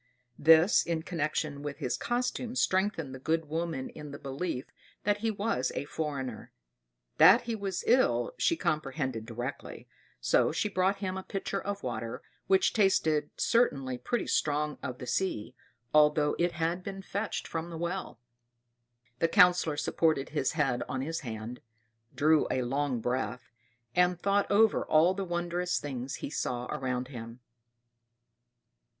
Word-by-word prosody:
This, 160 +5 +6
in 165 -1 -2
connection 155 -3 -2
with 145 -1 -5
his 125 - -1
costume, 245 0 -2
strengthened 185 - +1
the 130 - -8
good 160 +4 0
woman 160 -3 -3
in 150 - -9
the 140 - -7
belief 140 0 -4 0.4
that 205 0 +1
he 225 +1 0
was 200 - -1
a - - -2
foreigner. 140 -7 -4 0.7
That 180 +9 +8
he 235 -1 -4
was 195 -4 -3
ill, 260 - +3
she 335 - +3
comprehended 135 - -2
directly; 120 +4 -6 0.3
so - - +3
she 210 - -1
brought 190 +1 +1
him 185 0 -2
a - - -3
pitcher 195 +1 -3
of 200 0 -4
water, 115 -2 -4 0.2
which 190 -1 +3
tasted 160 -8 +2
certainly 135 - +1
pretty 240 - -1
strong 150 0 0
of 125 -1 -5
the 125 - -7
sea, 125 - -1 0.4
although 150 0 +4
it 175 0 +1
had 170 +2 -1
been 195 0 -6
fetched 200 +3 -3
from 165 +1 -4
the 165 - -6
well. 170 -6 -4 1.0
The 165 - +3
Councillor 180 -4 +4
supported 155 -4 +1
his 145 -3 0
head 135 -6 +1
on 130 - -2
his 160 +4 -3
hand, 115 -1 -6 0.5
drew 155 +1 +4
a 130 - 0
long 135 -1 -1
breath, 125 0 -3 0.4
and 180 -1 +3
thought 200 +2 +1
over 220 +1 +4
all 165 +4 +4
the 195 +1 -3
wondrous 175 0 -1
things 130 -2 -5
he - - -6
saw 125 -4 -2
around 130 -3 -2
him. 115 -2 -8
155 Hz, 150 wpm, -30 LUFS, 130-185 Hz, 1.0 s, That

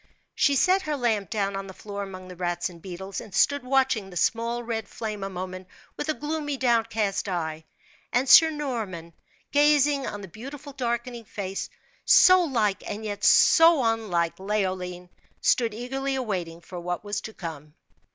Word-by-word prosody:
She 285 - +3
set 370 +7 +3
her 305 -5 -2
lamp 220 -7 0
down 200 -2 -1
on 195 0 -5
the 190 - -10
floor 200 -1 -7
among 185 -2 -8
the 180 - -10
rats 175 0 -2
and 170 -1 -15
beetles, 190 +1 -6
and 205 - -10
stood 285 -1 +3
watching 255 -6 +1
the 180 - -7
small, 235 +4 0
red 225 -3 -3
flame 215 -2 -5
a 195 - -3
moment 185 0 -6 0.3
with 300 - -4
a 310 - +1
gloomy, 295 -1 -3
downcast 225 -5 0
eye; 160 -3 -3 0.5
and 250 +3 +1
Sir 320 +4 +9
Norman, 225 - -4 0.4
gazing 290 -1 +3
on 205 - -5
the 195 - -8
beautiful 275 - -9
darkening 240 -2 -3
face, 195 -2 -5 0.3
so 370 0 +7
like 225 - 0
and 210 +1 -5
yet 205 -1 -5
so 325 -5 +6
unlike 210 -8 0
Leoline, 185 -3 -2 0.3
stood 235 -2 +2
eagerly 270 +5 -3
awaiting 180 -10 -3
what 175 0 -4
was 205 0 -3
to 220 - -8
come. 155 -3 -8
215 Hz, 165 wpm, -26 LUFS, 185-265 Hz, 0.5 s, Sir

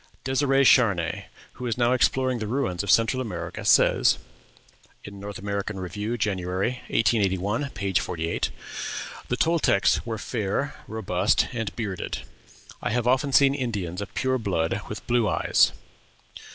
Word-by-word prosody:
Dêsirè 135 +1 +2
Charnay, 100 -11 +3 0.3
who 125 - -6
is 115 - -1
now 120 0 +3
exploring 130 0 +2
the 110 - -3
ruins 120 -7 -1
of 100 - -5
Central 115 +5 +3
America, 85 -8 -5
says - - +4 0.9
(North 100 0 -7
American 100 0 -3
Review, 105 +5 -3
January, 95 +3 -1
1881, 105 +3 +1
p. 100 -3 -3
48), 85 -2 -1 0.8
"The 125 - -1
Toltecs 160 - +2
were 115 -1 -4
fair, 110 +6 -2
robust, 100 -2 +1
and 115 -4 -2
bearded. 100 -6 -4 0.6
I - - -1
have 120 +2 0
often 130 +3 +2
seen 135 +1 +5
Indians 105 -10 -3
of 100 - -6
pure 130 0 0
blood 90 -7 -1
with - - -7
blue 120 -3 +2
eyes." - - +3
110 Hz, 135 wpm, -25 LUFS, 95-125 Hz, 0.9 s, seen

